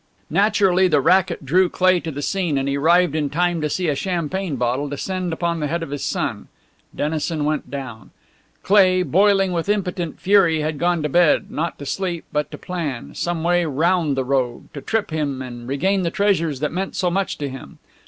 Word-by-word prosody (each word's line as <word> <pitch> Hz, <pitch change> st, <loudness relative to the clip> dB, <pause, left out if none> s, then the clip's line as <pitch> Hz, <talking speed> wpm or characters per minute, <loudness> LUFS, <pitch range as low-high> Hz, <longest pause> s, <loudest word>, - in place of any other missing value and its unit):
Naturally 195 Hz, 0 st, +3 dB
the 150 Hz, -5 st, +3 dB
racket 180 Hz, 0 st, +2 dB
drew 180 Hz, +6 st, +3 dB
Cleigh 185 Hz, 0 st, +3 dB
to 165 Hz, -, -6 dB
the 145 Hz, -1 st, -5 dB
scene, 175 Hz, -6 st, 0 dB
and 135 Hz, 0 st, -1 dB
he 140 Hz, -, 0 dB
arrived 170 Hz, +3 st, +3 dB
in 150 Hz, -2 st, -1 dB
time 175 Hz, +1 st, 0 dB
to 150 Hz, -, -1 dB
see 180 Hz, +4 st, -1 dB
a 150 Hz, -, +2 dB
champagne 175 Hz, +1 st, -2 dB
bottle 125 Hz, +3 st, -1 dB
descend 180 Hz, +5 st, -3 dB
upon 170 Hz, 0 st, -1 dB
the 150 Hz, -, -1 dB
head 165 Hz, +3 st, -2 dB
of 140 Hz, -, -7 dB
his 145 Hz, -, -4 dB
son. -, -, -2 dB, 0.5 s
Dennison 155 Hz, 0 st, -1 dB
went 150 Hz, 0 st, -2 dB
down. 130 Hz, -7 st, -7 dB, 0.5 s
Cleigh, 185 Hz, -2 st, +4 dB
boiling 195 Hz, +1 st, +3 dB
with 170 Hz, +2 st, -2 dB
impotent 180 Hz, -5 st, -2 dB
fury, 180 Hz, -5 st, +3 dB
had 155 Hz, -1 st, -3 dB
gone 175 Hz, -1 st, +1 dB
to 150 Hz, -, -1 dB
bed, 175 Hz, +1 st, +3 dB
not 165 Hz, +2 st, -3 dB
to 145 Hz, -, -8 dB
sleep 175 Hz, +1 st, -3 dB
but 150 Hz, 0 st, -1 dB
to -, -, -8 dB
plan; 160 Hz, -9 st, -5 dB
some 170 Hz, -2 st, -2 dB
way 175 Hz, +1 st, +2 dB
round 160 Hz, 0 st, +1 dB
the 130 Hz, -, 0 dB
rogue, 130 Hz, -2 st, -2 dB
to 140 Hz, -, -7 dB
trip 220 Hz, 0 st, -1 dB
him 145 Hz, -4 st, -2 dB
and 120 Hz, -2 st, -8 dB
regain 190 Hz, +9 st, +1 dB
the 170 Hz, -, 0 dB
treasures 170 Hz, -8 st, 0 dB
that 150 Hz, -, -1 dB
meant 190 Hz, +3 st, -3 dB
so 180 Hz, -2 st, 0 dB
much 195 Hz, +2 st, -1 dB
to 145 Hz, -, -3 dB
him. 135 Hz, 0 st, -9 dB
165 Hz, 205 wpm, -21 LUFS, 145-185 Hz, 0.5 s, Cleigh